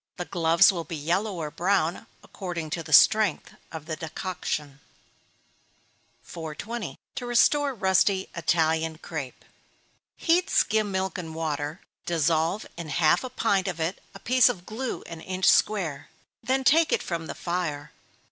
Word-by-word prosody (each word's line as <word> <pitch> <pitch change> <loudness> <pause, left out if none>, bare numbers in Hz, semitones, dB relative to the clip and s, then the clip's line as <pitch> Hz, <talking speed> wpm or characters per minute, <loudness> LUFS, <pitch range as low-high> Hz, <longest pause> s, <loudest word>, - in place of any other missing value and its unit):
The 180 - -4
gloves 170 +1 +4
will 170 -3 -4
be 165 - -6
yellow 180 +7 -1
or 155 -3 -4
brown, 180 +3 0 0.2
according 170 -5 -6
to 165 - -2
the 155 -1 -10
strength 210 +3 +5 0.2
of 160 -2 -7
the 160 -1 -4
decoction. 155 -4 -5 1.4
420. 180 +8 -6 0.2
To 245 - -5
restore 275 +3 +3
rusty 190 -1 +2
Italian 160 -1 +1
Crape. 155 -6 -7 0.7
Heat 350 +2 +2
skim 215 -1 +2
milk 190 0 -2
and 160 -2 -7
water 155 0 -3 0.3
dissolve 165 +3 +1
in 170 -2 -6
half 155 - +3
a 255 - -5
pint 200 -6 0
of 175 -3 -3
it 165 +4 -2
a - - -9
piece 255 +1 +4
of 180 -7 -5
glue 240 +4 -4
an 165 -1 -9
inch 185 +1 -3
square, 170 -10 +2 0.3
then 260 +3 0
take 320 +4 +4
it - - +1
from 165 -2 -4
the - - -6
fire. 160 -5 -3
175 Hz, 145 wpm, -26 LUFS, 160-205 Hz, 1.4 s, strength